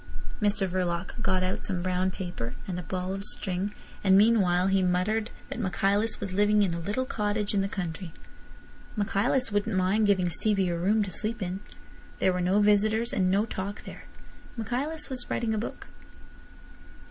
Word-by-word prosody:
Mr 205 -1 +2
Verloc 180 +3 -2
got 185 -5 +1
out 185 +1 -1
some 180 -3 -1
brown 185 0 +1
paper 175 -11 -5
and 180 -2 -3
a - - -3
ball 185 +1 -3
of 195 0 -4
string; 190 -1 -2 0.3
and 190 -1 +6
meanwhile 195 -5 +4
he 195 0 +3
muttered 185 +5 +1 0.2
that - - -5
Michaelis 200 +2 +1
was 200 -2 -4
living 205 +1 +4
in 185 -4 +1
a 170 - -3
little 205 +9 -1
cottage 210 -3 -1
in 200 - +2
the 195 - -1
country. 180 -2 -4 0.8
Michaelis 220 +4 +1
wouldn't 205 0 0
mind 195 +4 +3
giving 190 -3 +3
Stevie 195 +2 +1
a 170 - 0
room 205 +6 +2
to 195 - -5
sleep 215 +7 -2
in. 185 0 -3 0.6
There 185 - +2
were 180 - -1
no 185 +3 +3
visitors 215 +3 +3
and 185 -2 +2
no 200 +3 +3
talk 200 -1 -5
there. - - -10 0.5
Michaelis 275 +8 -2
was 255 -3 -3
writing 225 -2 0
a 215 - 0
book. 225 - -6
195 Hz, 175 wpm, -28 LUFS, 185-215 Hz, 0.8 s, and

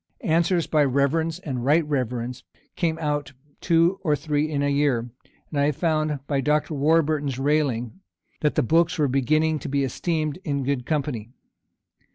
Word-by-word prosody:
Answers 170 0 +2
by 150 -2 +2
reverends 145 +5 +1
and 135 -9 -5
right 150 +5 +3
reverends 125 -3 -3 0.3
came 165 -3 0
out 145 -3 -2 0.3
two 170 +3 +2
or 150 -5 +2
three 150 +1 -1
in 145 -2 -1
a - - +1
year; 140 -5 +1 0.4
and 145 - -1
I 145 +1 +3
found, 155 -2 -1
by 140 -1 0
Dr. 150 +3 +1
Warburton's 150 -2 +1
railing, 135 -2 0 0.4
that 150 - 0
the - - +2
books 165 +7 +2
were 150 -2 +2
beginning 155 +4 +1
to - - -6
be 140 0 +1
esteemed 155 +4 -2
in 140 -3 -1
good 130 -2 -2
company. 140 -8 -2
150 Hz, 160 wpm, -24 LUFS, 135-160 Hz, 0.4 s, right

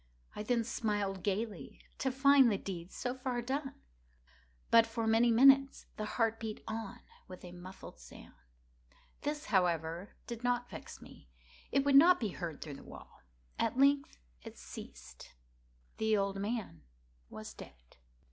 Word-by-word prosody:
I - - -4
then 230 +2 +1
smiled 205 -4 -2
gaily, 200 -5 -3 0.2
to 265 - 0
find 270 -1 +6
the 200 - +1
deed 180 -2 -7
so 245 - -3
far 255 -1 -3
done. 270 +3 -3 1.0
But, 230 0 +7
for 225 0 -3
many 225 +2 +4
minutes, 270 +3 +5
the 215 - -4
heart 225 -2 +1
beat 220 -2 -6
on 220 -2 -5 0.3
with 185 0 -10
a 175 - -9
muffled 180 +2 -11
sound. - - -14 0.9
This, 295 +1 -3
however, 170 0 0
did 235 0 -7
not 245 0 0
vex - - -9
me; - - -16 0.4
it 275 0 +2
would 285 - +3
not 345 +6 +8
be 220 - -1
heard 170 -4 -6
through 145 -3 -8
the - - -13
wall. - - -13 0.4
At - - 0
length 280 +1 +3 0.2
it - - -11
ceased. - - -11 0.6
The 220 -1 +2
old 195 0 -1
man 205 - -4 0.5
was - - -9
dead. - - -14
225 Hz, 150 wpm, -33 LUFS, 190-255 Hz, 1.0 s, not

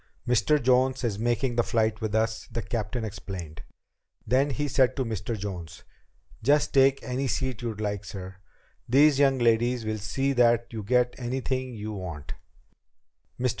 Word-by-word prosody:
"Mr. 125 +5 +3
Jones 130 +1 +2
is 110 -4 -1
making 120 +2 0
the 120 - +4
flight 110 -1 0
with 110 -1 -2
us," 110 0 0
the 115 0 -3
captain 115 0 -3
explained. 90 -6 -7 0.6
Then 135 +3 +2
he 145 +3 -2
said 130 -2 +2
to 130 - -1
Mr. 110 0 -3
Jones: 90 -6 -7 0.6
"Just 145 +4 +2
take 135 0 +4
any 130 +2 -2
seat 130 -3 -2
you 115 -2 -3
like, 105 -1 -3
sir. 95 -1 -8 0.5
These 140 +2 +5
young 135 -2 +4
ladies 120 0 +2
will 110 0 -2
see 135 +8 -1
that 120 -2 +3
you 110 - -4
get 125 +3 +2
anything 130 0 -3
you 105 0 -5
want." 80 -6 -6 1.1
Mr. 125 0 +1
120 Hz, 160 wpm, -27 LUFS, 105-130 Hz, 1.1 s, These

